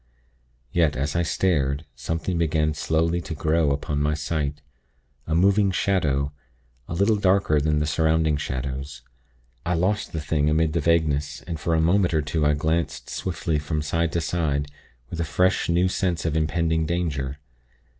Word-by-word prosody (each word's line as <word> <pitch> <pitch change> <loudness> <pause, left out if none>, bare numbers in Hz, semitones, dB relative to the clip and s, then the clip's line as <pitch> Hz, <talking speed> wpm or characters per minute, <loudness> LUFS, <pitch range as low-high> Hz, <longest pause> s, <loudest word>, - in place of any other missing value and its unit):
Yet, 80 -4 +2
as 70 +4 -2
I 85 - +2
stared, 75 -4 0
something 85 +2 -3
began 75 -1 +1
slowly 80 +2 0
to 80 - -6
grow 80 +1 +2
upon 70 +1 -1
my 75 +1 +1
sight 75 -1 -2 0.7
a 80 - 0
moving 100 +3 +4
shadow, 75 -8 0 0.5
a 80 - -4
little 100 +4 +3
darker 95 -6 +3
than 75 +1 +1
the 75 - +1
surrounding 80 0 +2
shadows. 65 0 -4 0.6
I 90 +1 0
lost 95 +5 0
the 80 - -3
thing 75 0 0
amid 80 0 +2
the 85 - +1
vagueness, 75 -3 +1
and 85 -2 -5
for 80 +1 0
a - - +2
moment 85 +1 +3
or 80 - +2
two 75 +2 -1
I 75 - +3
glanced 80 +3 -1
swiftly 85 -4 -2
from 75 +1 -2
side 80 +2 0
to 85 - +1
side, 75 -4 -1 0.4
with 85 - -5
a - - +1
fresh, 90 +4 +1
new 85 +2 +3
sense 90 -2 -1
of 80 -2 0
impending 80 0 +1
danger. 75 -6 -2
80 Hz, 165 wpm, -24 LUFS, 75-85 Hz, 0.7 s, moving